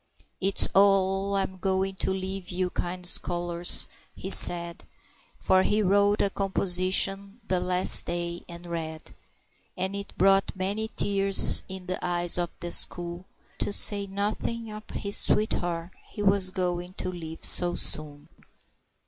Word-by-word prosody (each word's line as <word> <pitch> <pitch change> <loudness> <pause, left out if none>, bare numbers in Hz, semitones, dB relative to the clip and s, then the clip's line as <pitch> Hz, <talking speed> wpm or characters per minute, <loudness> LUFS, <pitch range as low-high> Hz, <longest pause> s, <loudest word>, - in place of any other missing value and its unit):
"It's 195 +1 +2
Oh, 195 0 +1
I'm 190 -1 -3
going 190 0 -2
to - - -3
leave 190 -1 -5
you, 180 0 -3
kind 180 +1 -6
scholars," 175 -1 0 0.3
he 190 - -5
said 170 -2 +7 0.5
For 185 0 +1
he 210 +3 0
wrote 205 +2 +1
a 200 - 0
composition 195 +2 +1
the 185 -1 -1
last 180 0 +2
day 175 0 -5
and 170 0 -12
read; 160 -2 -8 0.6
And 190 +2 -4
it 200 0 -8
brought 195 +1 +1
many 200 +4 -3
tears 195 -2 +4
in 190 -1 -8
the 185 0 -6
eyes 175 0 +1
of 175 -1 -3
the 175 - -6
school, 175 +1 -1 0.3
To - - -2
say 200 0 0
nothing 215 +3 -5
of 215 0 -12
his 200 0 -1
sweet 215 +1 0
heart 170 0 -5 0.2
he 205 - -8
was 195 -1 +2
going 180 -1 -5
to 185 - -5
leave 165 -2 -10
so 175 -1 +2
soon. 145 -1 -5
185 Hz, 145 wpm, -25 LUFS, 175-195 Hz, 0.6 s, said